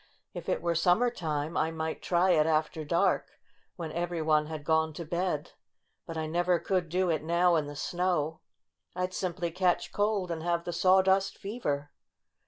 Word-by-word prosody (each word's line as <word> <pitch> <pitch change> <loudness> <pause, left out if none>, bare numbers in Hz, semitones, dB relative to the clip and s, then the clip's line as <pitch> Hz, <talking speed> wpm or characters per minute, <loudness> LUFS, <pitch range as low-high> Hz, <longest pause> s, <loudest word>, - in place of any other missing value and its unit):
"If - - -6
it - - -1
were 170 0 +1
summer 180 +9 +3
time 155 -6 -3
I 160 - +1
might 160 -1 -4
try 180 +1 +2
it 155 -2 +4
after 155 0 0
dark, 170 +5 +1 0.4
when 165 -3 -5
every 175 +1 -2
one 155 -1 +2
had 155 -2 -6
gone 160 +1 +2
to 170 +2 -6
bed. 170 -2 -2 0.6
But 165 - -5
I 160 - -1
never 175 +3 +1
could 180 -2 -1
do 180 +1 +1
it 155 - 0
now 170 +2 +3
in 155 -3 0
the 145 - -7
snow. 170 -1 -1 0.6
I'd 180 0 -2
simply 175 -2 -2
catch 180 0 +1
cold 205 -3 0
and 165 -1 -3
have 170 0 0
the 175 - -4
sawdust 190 +2 +3
fever. 150 -10 -3
170 Hz, 180 wpm, -29 LUFS, 160-180 Hz, 0.6 s, it